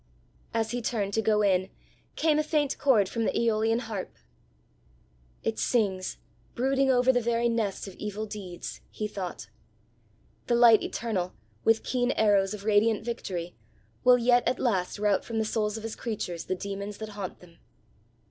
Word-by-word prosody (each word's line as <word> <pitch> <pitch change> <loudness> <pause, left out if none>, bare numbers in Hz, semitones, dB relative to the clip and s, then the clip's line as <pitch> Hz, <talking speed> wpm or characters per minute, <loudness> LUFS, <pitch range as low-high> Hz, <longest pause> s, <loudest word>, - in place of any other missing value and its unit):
As 225 -1 -1
he 245 0 -2
turned 210 -4 -2
to 220 - +2
go 210 -1 +2
in, 190 -1 +2 0.5
came 310 -1 +2
a - - +2
faint 300 -2 0
chord 230 -9 +4
from 230 +4 -2
the - - 0
aeolian 225 0 +2
harp. 220 -6 -5 1.3
"It 110 0 -1
sings, 190 - 0 0.4
brooding 270 +2 +2
over 255 0 +4
the 245 - +2
very 235 0 +1
nest 225 -4 -1
of 195 - -8
evil 210 +1 -4
deeds!" 195 -5 -7
he 215 - -4
thought. 195 -4 -6 1.0
"The 240 - +3
light 235 -2 +7
eternal, 190 -6 -3 0.3
with 225 0 +3
keen 245 -1 0
arrows 205 -2 +3
of 200 -1 -11
radiant 215 +1 +3
victory, 180 -7 -4 0.5
will 250 -1 +7
yet 245 0 +4
at 250 - +1
last 195 -8 0
rout 205 -2 +2
from 230 - -5
the 220 - +1
souls 215 -1 -1
of 220 - -8
his 225 -1 -4
creatures 190 -7 -4
the 185 - -1
demons 200 +1 -5
that 220 -1 -6
haunt 200 -3 -6
them! 170 -2 -18
220 Hz, 165 wpm, -28 LUFS, 200-235 Hz, 1.3 s, light